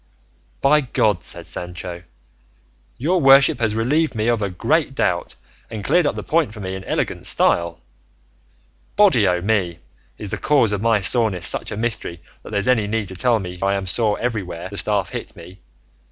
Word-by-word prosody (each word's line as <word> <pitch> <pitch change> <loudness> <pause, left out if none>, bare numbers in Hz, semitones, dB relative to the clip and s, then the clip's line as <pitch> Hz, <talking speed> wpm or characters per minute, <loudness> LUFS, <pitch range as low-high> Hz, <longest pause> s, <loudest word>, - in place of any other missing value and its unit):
"By 150 +2 +4
God," 105 -8 +1
said - - -7
Sancho, 90 0 -7 1.0
"your 170 +7 +1
worship 135 +1 +6
has 110 -2 0
relieved 145 +6 +1
me 110 +1 0
of 120 -2 +1
a 100 - -1
great 90 - 0
doubt, - - -1 0.3
and 110 -2 -6
cleared 175 - +3
up - - -1
the - - -5
point 155 -9 0
for - - -9
me 95 -2 -4
in 95 0 -6
elegant - - -2
style! 85 0 +1 1.2
Body 185 - +5
o' 90 -1 +1
me! 95 -5 0 0.4
is 105 -2 -7
the 105 - -3
cause 130 -6 +3
of 100 -1 -2
my 115 -2 +2
soreness 100 -4 +1
such - - -1
a - - -5
mystery 110 -7 -3 0.2
that - - -11
there's 100 +1 -1
any 115 -5 +3
need 105 -2 -2
to 95 - -7
tell 120 +6 +2
me 90 -3 -7
I 100 0 +1
am 95 -1 -3
sore 105 +2 0
everywhere 95 -8 -4
the 100 - -8
staff 100 -4 0
hit - - -7
me? 90 +3 -13
105 Hz, 185 wpm, -21 LUFS, 95-120 Hz, 1.2 s, worship